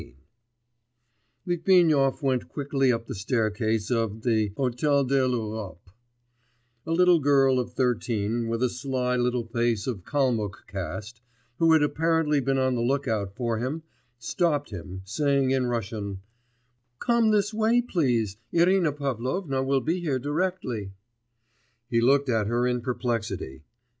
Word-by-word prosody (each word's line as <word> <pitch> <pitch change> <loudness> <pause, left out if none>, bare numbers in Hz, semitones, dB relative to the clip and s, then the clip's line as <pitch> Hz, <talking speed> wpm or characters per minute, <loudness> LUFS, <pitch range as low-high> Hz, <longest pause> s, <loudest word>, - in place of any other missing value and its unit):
XIX - - -15 1.3
Litvinov 165 -6 +3
went 130 -2 0
quickly 135 -2 0
up 115 -1 -2
the - - -6
staircase 110 0 -1
of 110 -2 -1
the 110 -4 +1
Hôtel 140 +2 +1
de 135 0 +2
l'Europe; 110 -7 -4 1.0
a - - -2
little 175 0 +5
girl 135 -2 +3
of 125 -1 -4
thirteen, 115 -2 -1
with 115 +2 -1
a 125 - +3
sly 125 0 -2
little 125 -1 0
face 115 -2 0
of 115 -8 -4
Kalmuck 115 -6 -1
cast, 100 +4 -6 0.4
who 165 -1 +5
had 155 -2 +5
apparently 160 -1 +1
been 135 0 0
on 130 -1 +1
the 120 - -1
look 135 +3 0
out 100 -4 -2
for 115 -2 -1
him, 140 +7 -3 0.3
stopped 145 +5 -1
him, 95 0 -7
saying 140 +5 +1
in 130 -2 +1
Russian: 105 -4 -4 0.8
'Come 235 - +2
this 210 0 +2
way, 220 +2 +3
please; 125 - 0
Irina 175 -1 +3
Pavlovna 135 - -2
will 135 0 +1
be 170 +6 -1
here 150 -7 -1
directly.' 145 - -2 1.0
He 115 -1 +3
looked 140 +4 +3
at 110 -4 +1
her 120 +2 +1
in 125 -1 0
perplexity. 115 - -3
125 Hz, 140 wpm, -26 LUFS, 115-145 Hz, 1.3 s, little